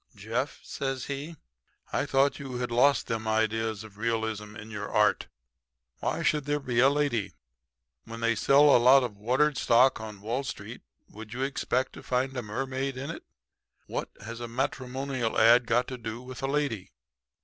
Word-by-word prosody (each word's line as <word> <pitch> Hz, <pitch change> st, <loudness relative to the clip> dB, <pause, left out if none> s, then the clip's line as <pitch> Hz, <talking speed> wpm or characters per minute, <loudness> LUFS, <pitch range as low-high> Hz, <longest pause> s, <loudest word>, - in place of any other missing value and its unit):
"'Jeff,' -, -, -3 dB
says 135 Hz, -2 st, -3 dB
he, 145 Hz, +4 st, -5 dB, 0.6 s
'I -, -, 0 dB
thought 135 Hz, +2 st, +2 dB
you 135 Hz, -3 st, -6 dB
had 125 Hz, -1 st, -3 dB
lost 135 Hz, +4 st, +4 dB
them 110 Hz, -1 st, -3 dB
ideas 110 Hz, -1 st, 0 dB
of 105 Hz, -2 st, -14 dB
realism 110 Hz, -2 st, -2 dB
in 110 Hz, +1 st, -9 dB
your 105 Hz, -1 st, -5 dB
art. 105 Hz, -1 st, +2 dB, 0.7 s
Why -, -, -2 dB
should 150 Hz, -2 st, +1 dB
there 145 Hz, 0 st, 0 dB
be 125 Hz, -4 st, -1 dB
a 130 Hz, +2 st, +7 dB
lady? 140 Hz, -8 st, 0 dB, 0.7 s
When 115 Hz, 0 st, -8 dB
they 115 Hz, 0 st, +2 dB
sell 140 Hz, +6 st, +5 dB
a 120 Hz, -, +5 dB
lot 130 Hz, +2 st, +7 dB
of 115 Hz, -4 st, -4 dB
watered 130 Hz, +7 st, +1 dB
stock 125 Hz, +1 st, +4 dB
on 105 Hz, -3 st, -8 dB
Wall 120 Hz, +6 st, -2 dB
Street 135 Hz, -, -7 dB, 0.3 s
would 110 Hz, +2 st, -10 dB
you 130 Hz, -, -1 dB
expect 130 Hz, -1 st, -1 dB
to -, -, -10 dB
find 130 Hz, +1 st, -1 dB
a 125 Hz, -, -2 dB
mermaid 130 Hz, +4 st, -3 dB
in 135 Hz, +2 st, -4 dB
it? -, -, -8 dB, 0.6 s
What -, -, -4 dB, 0.2 s
has 115 Hz, +1 st, -6 dB
a 120 Hz, -, -5 dB
matrimonial 130 Hz, 0 st, -2 dB
ad 115 Hz, +2 st, +6 dB
got 120 Hz, +2 st, +2 dB
to 130 Hz, -1 st, -6 dB
do 115 Hz, 0 st, -5 dB
with 125 Hz, 0 st, -9 dB
a 135 Hz, -, -1 dB
lady?' 140 Hz, -9 st, -1 dB
125 Hz, 180 wpm, -28 LUFS, 110-135 Hz, 0.7 s, a